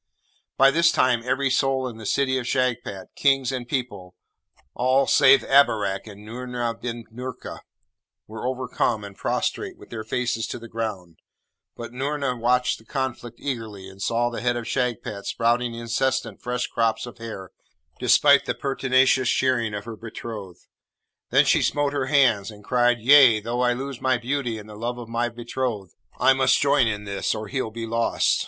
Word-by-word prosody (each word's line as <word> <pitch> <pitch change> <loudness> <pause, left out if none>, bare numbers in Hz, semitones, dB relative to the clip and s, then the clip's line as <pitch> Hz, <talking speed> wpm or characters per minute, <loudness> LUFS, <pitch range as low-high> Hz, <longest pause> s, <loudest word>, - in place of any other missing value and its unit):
By 135 0 +6
this 170 +2 +4
time 130 -5 +2
every 130 +2 0
soul 135 0 +1
in 120 -3 -8
the 110 -2 -7
City 130 +1 +1
of 120 - -6
Shagpat, 120 -7 -2
kings 135 -2 +2
and 125 -2 -4
people, 105 -9 -4 0.6
all 130 +2 +2
save 135 -1 +5
Abarak 105 -8 +2
and 105 0 -12
Noorna 120 0 -3
bin 120 -1 -5
Noorka, 125 +1 -7 0.7
were 110 +3 -6
overcome 125 -4 -1
and 100 -1 -9
prostrate - - -2
with - - -16
their 110 -2 -5
faces 120 0 -2
to - - -5
the 115 - -10
ground; 100 -8 -5 0.6
but 120 -1 -7
Noorna 135 0 -2
watched 125 +1 +1
the - - -18
conflict 120 -2 -4
eagerly, 110 -8 -5
and 95 0 -13
saw 120 +3 0
the 120 - -5
head 120 0 +1
of 120 - -5
Shagpat 120 -6 -2
sprouting 120 0 0
incessant 115 +3 -2
fresh 125 0 -2
crops 115 0 0
of 120 -1 -11
hair, 110 -5 -8 0.5
despite - - +5
the - - -2
pertinacious 130 -1 +2
shearing 120 -5 +1
of 100 - -6
her 115 -1 -7
betrothed. 105 -4 -8 0.6
Then - - +4
she - - +3
smote 145 -1 0
her 135 -2 -1
hands, 125 -8 +3
and 105 -1 -12
cried, 120 +1 +2
'Yea! 130 -3 +7
though 120 +3 -3
I 125 -1 +3
lose 135 0 -6
my 130 -1 +2
beauty 125 -1 -2
and 105 -1 -10
the 105 - -11
love 120 +3 -4
of 120 -2 -9
my 120 +1 -1
betrothed, 120 -5 -4 0.3
I 135 - +5
must 130 0 +3
join 140 -3 +3
in 105 -2 -2
this, 100 -1 -2
or 110 -1 -6
he'll 130 -2 -2
be 115 +1 -6
lost.' 115 +1 +1
120 Hz, 175 wpm, -24 LUFS, 110-130 Hz, 0.7 s, Yea